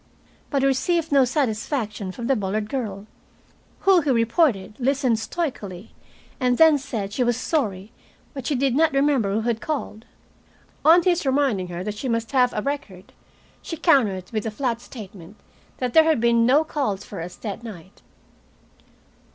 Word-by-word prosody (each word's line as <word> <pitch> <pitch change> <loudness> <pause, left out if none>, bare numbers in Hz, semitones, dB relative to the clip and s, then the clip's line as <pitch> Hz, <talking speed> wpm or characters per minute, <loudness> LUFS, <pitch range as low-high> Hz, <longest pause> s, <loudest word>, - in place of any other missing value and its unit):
But 275 -2 0
he - - +4
received 325 +4 0
no 275 -2 +5
satisfaction 220 -5 -2
from 235 +5 -7
the 270 +2 +2
Bullard 210 0 -2
girl, 210 -7 -4 0.8
who, 385 -3 +5
he 295 - -2
reported, 230 - +2
listened 260 -3 +1
stoically 220 - -5 0.5
and 250 -2 +1
then 320 -2 +6
said 220 -7 -5
she 250 - +1
was 240 -1 +1
sorry, 215 - -2 0.4
but 270 -3 -6
she 290 - 0
did 265 0 +1
not 315 0 +3
remember 275 -7 +2
who 215 +3 0
had 230 0 -1
called. 265 -7 -4 0.8
On 335 +3 +6
his 355 -1 +2
reminding 265 -9 +1
her 175 0 -5
that 210 +1 -4
she 265 - -3
must 230 -1 -1
have 250 -2 +3
a 210 - -3
record, 205 -10 -5 0.5
she 330 - -6
countered 210 - +2
with 215 -2 -2
the - - -1
flat 235 +1 -2
statement 200 -6 -11 0.4
that 250 -2 -3
there 320 -1 +7
had 320 -5 +3
been 235 0 +3
no 285 +5 +5
call 275 -10 -2
for 195 -2 -8
us 175 +1 -7
that 210 0 -6
night. 195 -5 -11
240 Hz, 170 wpm, -23 LUFS, 210-280 Hz, 0.8 s, there